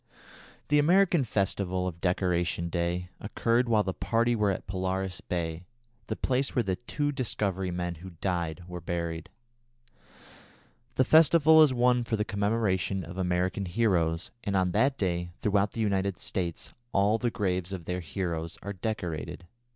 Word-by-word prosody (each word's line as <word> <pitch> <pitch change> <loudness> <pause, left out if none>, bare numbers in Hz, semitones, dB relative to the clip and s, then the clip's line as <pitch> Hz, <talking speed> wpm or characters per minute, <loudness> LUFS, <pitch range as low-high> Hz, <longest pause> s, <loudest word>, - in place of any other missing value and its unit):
The 150 0 +5
American 175 0 +4
festival 95 -4 -1
of 85 -2 -5
"Decoration 90 -2 0
Day" 85 +1 -1
occurred 115 +3 +1
while 110 -2 +4
the 95 -1 -2
party 115 +4 +1
were 105 -2 +2
at 95 - -2
Polaris 95 0 -2
Bay, 85 0 -3 0.4
the 110 - -2
place 130 +3 -1
where 120 - +3
the 95 -3 -1
two 145 +7 -2
Discovery 95 -7 -1
men 90 0 -2
who 95 -1 -9
died 85 -2 -2
were 90 -1 -7
buried. 85 -1 -3 1.7
The 130 - +3
festival 160 +1 +6
is 150 -3 +6
one 125 0 +3
for 115 - -1
the 105 -1 -1
commemoration 100 -3 0
of 85 +4 -8
American 90 +2 0
heroes, 85 -5 +1
and 100 -2 -1
on 90 -1 +2
that 135 +8 +2
day 85 -2 -1
throughout 100 -1 +2
the 115 - -3
United 100 -2 0
States 85 -3 -3 0.2
all 100 +3 +3
the 120 - +1
graves 95 -4 -1
of 90 -4 -6
their 90 +1 -2
heroes 85 -2 -4
are 100 - -4
decorated. 90 -6 -4
95 Hz, 155 wpm, -28 LUFS, 90-115 Hz, 1.7 s, festival